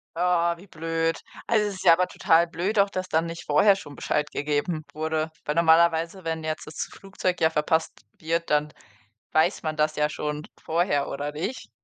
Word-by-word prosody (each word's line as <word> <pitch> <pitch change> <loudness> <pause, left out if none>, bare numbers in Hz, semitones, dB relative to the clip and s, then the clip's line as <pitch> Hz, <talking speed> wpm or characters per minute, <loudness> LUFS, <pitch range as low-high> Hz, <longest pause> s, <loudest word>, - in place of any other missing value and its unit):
Oh, 170 0 +2
wie 190 +4 -15
blöd. 165 -1 -1 0.3
Also, 215 -2 +2
es 200 - -4
ist 190 - -8
ja 170 - +9
aber 180 +2 +2
total 165 +1 +3
blöd 185 +6 -1
auch, 200 0 +4
dass 185 -1 -4
da 160 -2 +2
nicht 165 0 -6
vorher 170 +7 +5
schon 145 -7 -10
Bescheid 150 +2 -1
gegeben 150 +2 -1
wurde, 155 +1 -1 0.2
weil 150 - -1
normalerweise, 170 +2 +3
wenn 160 -1 -3
jetzt 155 0 -3
das 155 - -5
Flugzeug 190 -2 -3
ja 160 - +4
verpasst 160 +1 +1 0.2
wird, 165 +1 -2
dann 150 0 +1 0.6
weiß 160 +5 +3
man 155 -1 -2
das 155 0 +1
ja 150 0 +1
schon 150 0 -4
vorher 160 -3 0
oder 145 +1 -4
nicht? 190 - -5
165 Hz, 190 wpm, -25 LUFS, 155-180 Hz, 0.6 s, ja